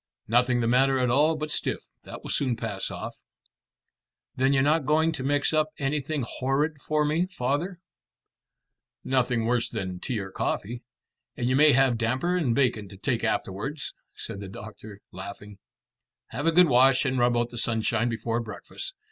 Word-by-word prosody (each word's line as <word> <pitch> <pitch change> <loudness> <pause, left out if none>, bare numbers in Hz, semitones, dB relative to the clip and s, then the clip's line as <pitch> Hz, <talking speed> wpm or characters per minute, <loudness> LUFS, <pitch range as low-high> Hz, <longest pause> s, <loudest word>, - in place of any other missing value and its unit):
"Nothing 120 +2 +3
the 115 - +1
matter 135 +3 +3
at 125 -2 +1
all 150 +5 +4
but 155 0 -4
stiff. - - -1 0.2
That - - -9
will - - -4
soon 130 -4 +1
pass 110 -4 -4
off." - - -7 1.1
"Then 130 +1 +2
you're 135 -1 +3
not 150 -1 +2
going 160 +2 +3
to 160 -4 -5
mix 145 +2 +1
up 155 0 +2
anything 145 -1 -1
horrid 140 +3 -1
for 150 +1 +1
me, 160 +5 +1
father?" 170 +4 -2 1.2
"Nothing 125 -3 +1
worse 120 0 +1
than 95 -2 -4
tea 120 - -3
or 95 -2 -5
coffee; 120 +5 -3 0.6
and 120 - -1
you 130 - +2
may 150 +1 +6
have 130 -3 +3
damper 130 +10 0
and 140 -10 +1
bacon 115 -7 +1
to 95 - -12
take 120 +3 -1
afterwards," 135 +10 -2 0.2
said 100 - -6
the 100 -1 -7
doctor, 105 0 -10
laughing. 100 +2 -9 0.7
"Have 145 +7 -3
a - - +5
good 180 +1 +6
wash 130 0 +5
and 130 -1 0
rub 120 0 +3
out 120 0 0
in - - -23
the 120 - -4
sunshine 115 0 +1
before 115 0 -2
breakfast. 110 -4 -7
130 Hz, 175 wpm, -26 LUFS, 115-145 Hz, 1.2 s, may